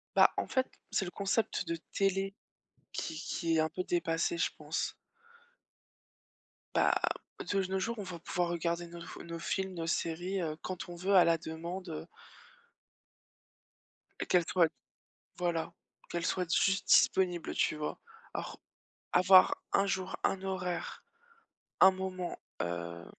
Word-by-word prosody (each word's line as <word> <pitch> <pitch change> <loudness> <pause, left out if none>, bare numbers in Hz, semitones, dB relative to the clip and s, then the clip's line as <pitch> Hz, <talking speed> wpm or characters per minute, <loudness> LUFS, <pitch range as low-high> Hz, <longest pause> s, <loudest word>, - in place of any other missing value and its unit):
Bah, - - +7
en - - 0
fait, 260 -1 +1 0.2
c'est 195 - +1
le 175 - -5
concept 200 -2 0
de 170 - 0 0.2
télé 195 0 +1 0.6
qui 160 - -3
qui 165 +1 -1
est - - +4
un 160 - +2
peu 185 - -3
dépassé, 170 - 0
je - - +2
pense - - -2 1.8
bah, - - +4 0.6
de 195 -1 +2
nos 190 - +1
jours, 230 +2 -2
on - - -3
va 180 -2 -6
pouvoir 175 +1 -1
regarder 170 0 -1
nos 170 0 -9
f - - -9
nos 170 0 -6
films, 190 +2 -2
nos 165 -1 -3
séries, 175 +4 -1
heu, 155 -2 -2
quand 185 -1 -5
on 175 - -6
veut 185 +4 0
à 180 - +9
la 165 -1 +4
demande, 170 +4 -6
heu 155 - -5 2.2
qu'elle 175 -2 +4
soit 170 -3 +4 0.7
voilà, 170 -2 -1 0.4
qu'elle 170 -1 -2
soit 180 -3 0
juste 195 0 +2
disponible, 180 -3 +4
tu - - +2
vois? 150 0 -4 0.3
Alors, - - -5 0.5
avoir 185 +1 +7
un 200 - +4
jour, 190 -1 -1
un 190 - +1
horaire. 185 -2 -3 0.8
Un 190 - +10
moment, 185 -1 -4 0.2
heu, 85 0 -4
180 Hz, 145 wpm, -32 LUFS, 165-190 Hz, 2.2 s, Un